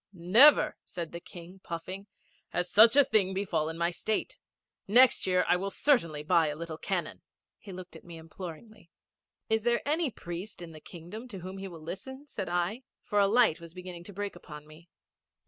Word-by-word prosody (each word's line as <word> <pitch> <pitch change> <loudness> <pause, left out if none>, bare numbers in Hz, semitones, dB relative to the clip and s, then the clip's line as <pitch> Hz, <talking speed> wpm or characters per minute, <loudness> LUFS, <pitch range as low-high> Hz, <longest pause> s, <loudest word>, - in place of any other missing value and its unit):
'Never,' 205 - +6
said 170 -2 -6
the 170 - -6
King, 180 +1 -12
puffing, 185 +4 -6 0.4
'has 180 0 -1
such 225 +4 +7
a 285 - +8
thing 195 -5 +1
befallen 165 -5 -1
my 170 +1 +1
State. 215 +5 -3 0.5
Next 245 +3 +5
year 180 -1 +2
I 180 - +4
will 195 +2 -3
certainly 170 - +1
buy 165 0 +3
a 150 - -3
little 165 0 -7
cannon.' - - -3 0.4
He 200 - -11
looked 185 0 -10
at - - -12
me 170 -1 -10
imploringly. 170 +4 -10 0.6
'Is 220 0 +2
there 235 +3 0
any 310 +1 +1
priest 175 0 -8
in 170 -2 -8
the 155 - -11
Kingdom 180 +8 -10
to 195 -7 -9
whom 185 +2 -7
he 195 - -5
will 170 -4 -10
listen?' 265 - -8
said 200 -9 -5
I, 175 +7 -1 0.2
for 210 -2 0
a 200 - +5
light 220 -6 +3
was 170 +1 -12
beginning 180 -1 -8
to 205 - -9
break 205 0 -4
upon 150 -4 -11
me. 155 +3 -16
185 Hz, 190 wpm, -29 LUFS, 170-215 Hz, 0.6 s, a